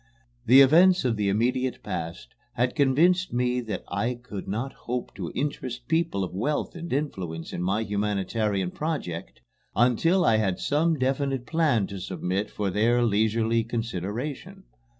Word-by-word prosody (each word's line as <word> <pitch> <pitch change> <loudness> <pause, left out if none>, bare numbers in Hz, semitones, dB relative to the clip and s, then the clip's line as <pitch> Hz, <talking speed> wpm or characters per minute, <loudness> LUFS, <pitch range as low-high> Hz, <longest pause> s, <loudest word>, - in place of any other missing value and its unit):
The 130 +4 +9
events 175 +5 +6
of 120 -3 +2
the 105 -2 0
immediate 125 +4 0
past 80 -7 -5 0.2
had 125 +1 0
convinced 165 +6 +3
me 125 0 +1
that 110 -3 -5
I 115 +7 -1
could 120 -5 -8
not 120 +7 -3 0.2
hope 125 0 -3
to - - -5
interest 130 -4 -3
people 160 - 0
of 90 - -5
wealth 145 +11 -1
and 170 0 -7
influence 95 - -3
in - - -3
my 95 +5 0
humanitarian 105 -2 -1
project 140 - -4 0.3
until 165 - +3
I 110 -4 +4
had 95 -4 0
some 160 +3 +1
definite 135 -1 -1
plan 150 -10 +2
to 100 0 -7
submit 95 +2 -2
for 100 -2 -2
their 115 +5 +2
leisurely 110 +1 +2
consideration. 115 - -4
120 Hz, 150 wpm, -26 LUFS, 100-140 Hz, 0.3 s, The